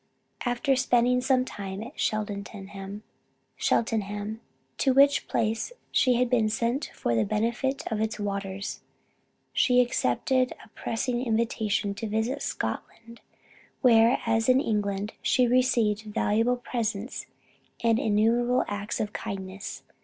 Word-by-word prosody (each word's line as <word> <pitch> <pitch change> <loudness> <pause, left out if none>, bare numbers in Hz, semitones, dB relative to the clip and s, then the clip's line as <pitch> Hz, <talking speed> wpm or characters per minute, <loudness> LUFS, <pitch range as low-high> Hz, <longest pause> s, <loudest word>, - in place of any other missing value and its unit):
After 245 +3 +1
spending 250 -1 +3
some 255 -1 +2
time 195 -3 -6
at 250 +6 -11
Cheltenham, 200 -1 -4 0.6
to 205 - -1
which 280 +1 +5
place 225 - -1 0.2
she 255 -2 +4
had 250 +1 +2
been 235 -3 +2
sent 235 +6 -1
for 120 - -1
the 110 -1 +3
benefit 235 - -1
of 215 -1 -1
its 220 0 -2
waters, 200 -1 -4 0.7
she 250 0 +4
accepted 250 - +1
a - - -22
pressing 240 +3 -2
invitation 220 -3 0
to 220 +3 -5
visit 220 +4 -1
Scotland, 230 +1 -5 0.6
where, 235 -1 +6
as 225 +1 +2
in 255 +1 +6
England, 205 -4 -1
she 250 - +3
received 235 -4 +2
valuable 225 +3 +2
presents 230 -2 -3 0.6
and 230 -1 +3
innumerable 230 +4 +2
acts 205 +1 -3
of 210 -1 -2
kindness. 195 0 -6
225 Hz, 120 wpm, -27 LUFS, 205-245 Hz, 0.7 s, where